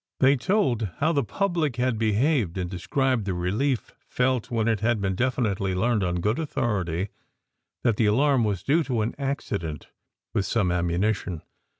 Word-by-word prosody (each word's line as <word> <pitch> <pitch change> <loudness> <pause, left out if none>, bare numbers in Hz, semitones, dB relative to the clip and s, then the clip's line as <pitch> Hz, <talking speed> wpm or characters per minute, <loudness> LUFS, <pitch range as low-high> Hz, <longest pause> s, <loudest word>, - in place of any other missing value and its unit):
They 135 +1 +5
told 130 - +1
how 155 +3 +2
the 140 -4 +1
public 170 - -1
had 125 -3 0
behaved, 110 - +1
and 90 -1 -2
described 125 - 0
the 95 -2 -1
relief 110 +9 -1 0.2
felt 125 -2 0
when 115 -2 0
it 110 -2 +2
had 115 0 +1
been 95 -1 0
definitely 100 -5 0
learned 110 +2 +1
on 90 -1 -1
good 105 - 0
authority 100 - -1 0.7
that 115 -4 +2
the 110 - +3
alarm 135 +3 +3
was 100 -5 -1
due 160 +4 +3
to 120 -5 0
an 110 +3 -1
accident 100 - -3 0.4
with 100 - 0
some 105 -6 +1
ammunition. 90 0 -1
110 Hz, 165 wpm, -25 LUFS, 95-130 Hz, 0.7 s, They